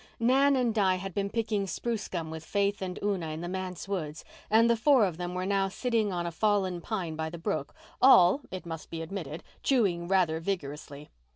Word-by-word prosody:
Nan 270 +4 +4
and 245 -3 +1
Di 195 -4 +3
had 190 0 -6
been 200 +1 -1
picking 215 -3 -1
spruce 220 +4 -3
gum 165 -3 -4
with 160 0 -7
Faith 200 +3 0
and 185 -1 -4
Una 195 -5 0
in 155 +1 -5
the 175 - -4
manse 185 -1 -5
woods 160 -6 -4 0.2
and 225 +2 +5
the 235 - +4
four 245 0 +4
of 175 -4 -3
them 180 0 -4
were 185 0 -2
now 195 0 +1
sitting 225 0 0
on 175 -1 -2
a 170 - -2
fallen 190 -1 +1
pine 175 -6 -3
by 160 0 -3
the 170 - -7
brook, 165 -5 -3 0.3
all, 255 -2 +7
it 185 -1 -7
must 165 -2 -7
be 165 0 -5
admitted, 165 -3 -6 0.2
chewing 195 -10 +1
rather 175 -4 +2
vigorously. 150 -5 -5
190 Hz, 205 wpm, -29 LUFS, 170-210 Hz, 0.3 s, all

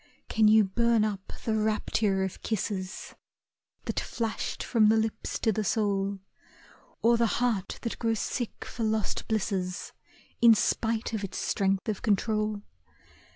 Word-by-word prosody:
Can 220 -1 +4
you 215 0 +7
burn 230 +2 +2
up 200 -3 -4
the 220 - +1
rapture 215 -2 +1
of 190 - -5
kisses 195 -3 -3 0.7
That - - -1
flashed 225 -2 -3
from 220 -3 +4
the 220 - +4
lips 220 0 -2
to 225 - +1
the 215 +1 -1
soul, 200 -1 0 0.9
Or 235 +1 +5
the 230 0 +3
heart 225 -6 0
that 230 - -4
grows 225 -1 +1
sick 240 -3 -3
for - - -7
lost 220 -1 -1
blisses 195 -4 -2 0.5
In 230 -1 +8
spite 225 +2 0
of 215 -2 -2
its 190 -1 -5
strength 195 0 0
of 215 -3 -2
control? 215 0 0
215 Hz, 145 wpm, -28 LUFS, 200-225 Hz, 0.9 s, In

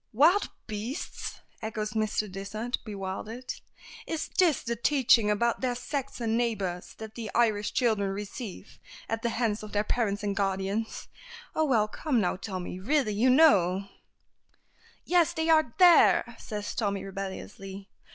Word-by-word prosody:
"Wild 325 - +4 0.2
beasts!" 220 - -5 0.2
echoes 215 -1 -3
Mr. 215 -1 0
Dysart, 205 +5 -4
bewildered. 215 +4 -5 0.5
"Is 320 -1 -3
this 335 -8 +4
the 235 0 -2
teaching 240 -3 +4
about 235 +3 +1
their 250 -2 0
Saxon 245 -3 -3
neighbors 205 -7 -2
that 220 -1 -9
the 225 -2 -6
Irish 215 -3 +2
children 215 -6 +1
receive 205 +1 -7 0.3
at 225 0 -2
the 235 - 0
hands 225 -2 -1
of 215 -1 -9
their 205 0 +2
parents 210 -2 -1
and 200 -1 -1
guardians. 195 +2 -2 0.5
Oh, 315 - +2
well, 225 -7 +3
come 255 +3 -1
now, 180 -4 +1
Tommy, 185 -2 -5
really, 255 +1 +1
you 230 +6 +3
know 200 - +5 0.6
" - - -33
"Yes; 345 -1 +3
they 320 -1 -1
are 310 -7 +4
there," 355 -2 +6
says 210 -2 -5
Tommy, 200 -3 -1
rebelliously. 195 0 -7
220 Hz, 140 wpm, -28 LUFS, 200-245 Hz, 0.6 s, there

